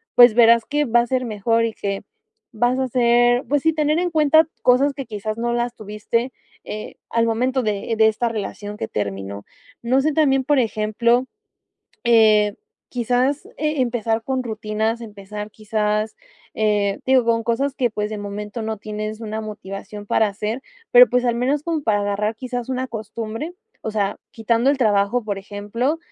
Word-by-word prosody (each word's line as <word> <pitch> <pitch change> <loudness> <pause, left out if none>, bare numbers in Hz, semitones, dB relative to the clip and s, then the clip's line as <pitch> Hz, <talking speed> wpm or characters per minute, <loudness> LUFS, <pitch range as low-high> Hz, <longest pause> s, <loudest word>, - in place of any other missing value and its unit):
Pues 245 -2 +8
verás 235 -1 +6
que 295 0 0
va 240 0 +4
a 235 - -3
ser 255 0 0
mejor 225 +1 +1
y 225 - -3
que 200 -1 -3 0.6
vas 245 +3 +2
a 260 - 0
ser, 240 +1 +3
pues 290 -1 +1
sí, 320 0 +3
tener 305 +1 +1
en 355 0 0
cuenta 315 0 +4
cosas 270 +3 +4
que 275 -1 -6
quizás 215 -1 -5
no 235 +1 -1
las 240 0 -1
tuviste, 215 +4 -2 0.3
eh, 215 0 -7
al 230 0 +2
momento 250 +3 0
de 215 +1 -1
de 220 0 +6
esta 230 +2 0
relación 210 -1 -5
que 110 - -3
terminó. 100 0 -4 0.4
No 250 +3 +2
sé 305 +2 +1
también, 270 -4 +2
por 290 -2 +3
ejemplo, 235 +2 +1 0.8
eh, 215 -3 +5 0.3
quizás, 250 +4 0
e 300 -1 -1
empezar 225 -2 0
con 260 0 -2
rutinas, 220 0 -2
empezar, 210 -1 -8
quizás, 215 0 -1 0.4
eh, 205 -2 +1
digo, 260 -2 +4
con 230 0 +1
cosas 265 +4 0
que, 250 -4 +1
pues, 210 0 -2
de 215 - -5
momento 205 +2 -5
no 220 0 -3
tienes 215 +1 -5
una 220 0 -4
motivación 205 -1 -7
para 220 +1 +2
hacer, 210 +5 -4 0.3
pero - - +9
pues 250 0 +2
al 240 -1 +1
menos 275 +4 0
como 325 -2 -1
para 210 -2 +2
agarrar 205 +2 -1
quizás 245 0 -5
una 260 0 -2
costumbre, 225 +6 -5 0.3
o 220 - -4
sea, 205 -2 -1
quitando 230 +3 +1
el 285 - +2
trabajo, 215 0 +2
por 205 -2 -3
ejemplo, 205 +9 -2
230 Hz, 175 wpm, -21 LUFS, 210-255 Hz, 0.8 s, pero